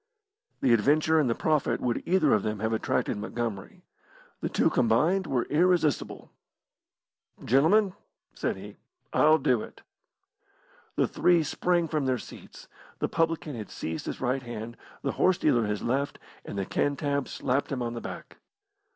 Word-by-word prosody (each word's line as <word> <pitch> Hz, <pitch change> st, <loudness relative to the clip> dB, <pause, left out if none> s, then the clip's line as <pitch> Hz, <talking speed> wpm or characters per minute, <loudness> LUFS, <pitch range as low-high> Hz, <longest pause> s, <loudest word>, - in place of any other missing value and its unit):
The 125 Hz, -, +4 dB
adventure 150 Hz, +8 st, +3 dB
and 140 Hz, -5 st, +2 dB
the 115 Hz, -, +1 dB
profit 155 Hz, -3 st, +1 dB
would 120 Hz, -2 st, -1 dB
either 185 Hz, +2 st, +3 dB
of 105 Hz, -, +3 dB
them 110 Hz, +1 st, -2 dB
have 110 Hz, +2 st, -1 dB
attracted 110 Hz, 0 st, 0 dB
Montgomery. 115 Hz, -2 st, -5 dB, 0.6 s
The -, -, -2 dB
two -, -, +2 dB
combined 160 Hz, +12 st, +2 dB
were 125 Hz, -3 st, +1 dB
irresistible. 170 Hz, -1 st, +1 dB, 1.1 s
"Gentlemen," 180 Hz, -, +4 dB, 0.4 s
said -, -, -2 dB
he, -, -, -10 dB, 0.4 s
"I'll 155 Hz, +1 st, +5 dB
do 125 Hz, -6 st, +1 dB
it!" -, -, -11 dB, 1.1 s
The -, -, +2 dB
three 175 Hz, -2 st, +3 dB
sprang 175 Hz, +2 st, 0 dB
from 150 Hz, -3 st, -1 dB
their 130 Hz, -1 st, +1 dB
seats. -, -, -12 dB, 0.3 s
The -, -, -1 dB
publican 165 Hz, -2 st, -1 dB
had 110 Hz, -3 st, -7 dB
seized 80 Hz, 0 st, -5 dB
his -, -, -4 dB
right 130 Hz, +1 st, 0 dB
hand, 120 Hz, -1 st, -7 dB, 0.3 s
the -, -, 0 dB
horse 185 Hz, -1 st, +4 dB
dealer 120 Hz, -, +2 dB
his 105 Hz, 0 st, -2 dB
left, 135 Hz, +4 st, -1 dB, 0.3 s
and -, -, -7 dB
the 100 Hz, -, -1 dB
Cantab 140 Hz, +2 st, -1 dB
slapped 135 Hz, +2 st, -1 dB
him 130 Hz, -3 st, -2 dB
on 120 Hz, 0 st, -3 dB
the 120 Hz, -, -5 dB
back. -, -, -8 dB
135 Hz, 155 wpm, -27 LUFS, 115-160 Hz, 1.1 s, I'll